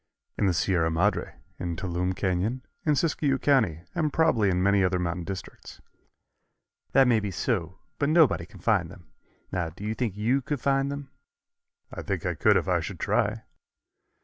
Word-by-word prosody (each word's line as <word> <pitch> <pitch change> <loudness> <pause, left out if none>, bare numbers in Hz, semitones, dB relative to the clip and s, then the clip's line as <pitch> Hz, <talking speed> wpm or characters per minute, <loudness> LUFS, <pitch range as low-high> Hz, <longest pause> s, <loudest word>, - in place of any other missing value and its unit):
"In 100 - +1
the 90 - +2
Sierra 85 -1 +1
Madre, 90 +5 0 0.2
in 85 -1 -3
Touloumne 90 +1 -2
Canyon, 100 +7 -1 0.2
in 150 - +4
Siskiyou 145 -3 +1
County 110 - +2
and 155 -3 0
probably 130 -12 +3
in 90 0 +1
many 100 0 +4
other 90 0 +2
mountain 85 -1 -2
districts." 95 0 -8 1.1
"That 135 -1 +6
may 115 -3 +4
be 105 -1 -3
so, 95 -2 -2 0.2
but 145 - +1
nobody 140 - +4
can 95 - -15
find 95 -5 +2
them. 85 -4 -15 0.4
Now, 90 -3 -1
do 90 +5 -12
you 105 +1 -1
think 110 -4 -3
you 120 +6 +1
could 145 +2 -3
find 135 +2 +1
them?" 140 -1 -7 0.8
"I - - -5
think - - -3
I - - 0
could - - +4
if - - -1
I - - +2
should - - -6
try." - - 0
100 Hz, 175 wpm, -27 LUFS, 90-135 Hz, 1.1 s, That